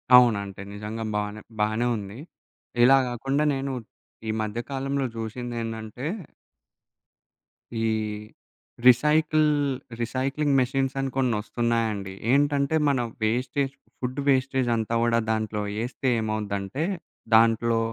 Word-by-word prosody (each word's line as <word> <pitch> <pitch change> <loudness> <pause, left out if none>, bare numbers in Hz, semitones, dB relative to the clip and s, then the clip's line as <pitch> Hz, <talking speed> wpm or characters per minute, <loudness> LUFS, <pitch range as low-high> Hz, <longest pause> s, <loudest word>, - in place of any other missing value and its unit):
అవునంటే 100 -6 +4
నిజంగ 105 +2 -6 0.2
బానె 105 +1 -2 0.2
బానే 110 +3 +1
ఉంది. 100 +3 -7 0.6
ఇలా 135 +2 +8
గాకుండా 135 +5 0
నేను 135 0 -2 0.6
ఈ - - +1
మధ్యకాలంలో 135 +5 -2
జూశిందేందంటే... 115 +1 -4 1.7
ఈ 115 0 0 1.0
రిసైకిల్ 150 +4 +5 0.5
రిసైక్లింగ్ 135 +4 0
మెషిన్స్ 135 +1 0
అని 135 0 0
కొన్నొస్తున్నాయండి. 115 -4 0 0.2
ఏంటంటే, 145 +1 +3
మన 140 -3 +2 0.2
వేస్టేజ్ 130 +4 0 0.3
ఫుడ్ 130 +2 -3
వేస్టేజంతా 130 -4 +2
గుడా 115 0 +3
దాంట్లో 110 -1 -1 0.2
ఎస్తే 130 +2 -3
ఏమవుద్దంటే, 110 +3 -2 0.5
దాంట్లో 115 0 +4
120 Hz, 90 wpm, -26 LUFS, 110-135 Hz, 1.7 s, ఇలా